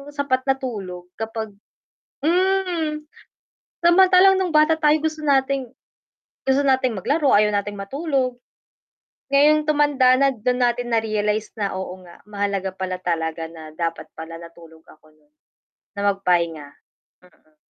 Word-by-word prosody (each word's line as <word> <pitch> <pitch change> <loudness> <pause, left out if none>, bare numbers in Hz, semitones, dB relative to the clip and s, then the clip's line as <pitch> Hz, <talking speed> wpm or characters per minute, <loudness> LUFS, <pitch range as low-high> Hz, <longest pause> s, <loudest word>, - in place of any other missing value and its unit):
sapat 260 -3 0
na 270 - +3
tulog 185 -8 -6
kapag 220 -1 -4 0.7
hmm. 350 -4 0 0.8
Samantalang 375 +2 +6
no'ng 365 - -1
bata 305 +1 +5
tayo 300 +1 +4
gusto 315 -1 -2
nating 270 -3 +1 0.8
gusto 265 +1 +2
nating 260 -5 +1
maglaro, 285 - +1
ayaw 210 +1 +5
nating 205 0 -2
matulog. 265 +3 -2 1.0
Ngayong 300 +2 +4
tumanda 285 -4 +3
na, 275 -1 +3
doon 250 +3 -1
natin 240 0 -1
na-realize 215 -1 -1
na, 205 -2 -2
"Oo, 185 0 -7
nga, 170 -1 -15
mahalaga 200 -2 -3
pala 185 -1 -4
talaga 165 -2 -3
na 160 -2 -11
dapat 165 -1 -3
pala 165 +1 -8
natulog 165 -1 -14
ako 155 0 -20
noon, 150 -1 -33 0.6
na 200 - -4
magpahinga." 170 -6 -1 0.6
Mm. 155 -3 -27
225 Hz, 130 wpm, -22 LUFS, 180-285 Hz, 1.0 s, Samantalang